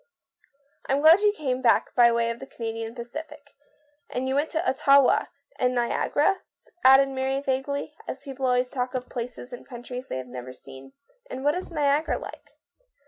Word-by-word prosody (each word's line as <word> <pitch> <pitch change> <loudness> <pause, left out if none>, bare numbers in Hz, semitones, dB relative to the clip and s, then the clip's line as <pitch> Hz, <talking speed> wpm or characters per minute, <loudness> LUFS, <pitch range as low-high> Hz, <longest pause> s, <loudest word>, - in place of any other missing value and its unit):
" 280 0 -41
I'm 275 +1 +2
glad 320 +4 +8
you 420 0 +4
came 260 -10 -3
back 240 -3 +3
by 240 -1 +6 0.2
the 235 - -11
Canadian 225 0 -5
Pacific. 285 +4 -9 0.6
And 255 +1 -3
you 265 - 0
went 290 +3 +1
to 335 +3 -2
Ottawa 275 0 +4
— - - -38
and 250 0 +1
Niagara," 290 +9 +1 0.4
added 270 +1 +7
Mary 265 0 -1
vaguely, 275 +1 -2
as - - -6
people 270 -2 -3
always 250 0 +1
talk 255 0 -3
of 250 -1 -4
places 245 +1 -6
and 245 - -8
countries 250 0 -8
they - - -4
have 130 - -5
never 125 0 -8
seen. 135 +1 -13 0.2
" - - -31
And 260 +1 -6
what 290 +1 +3
is 365 - -4
Niagara 295 -1 +1
like - - -11
265 Hz, 180 wpm, -25 LUFS, 245-285 Hz, 0.6 s, glad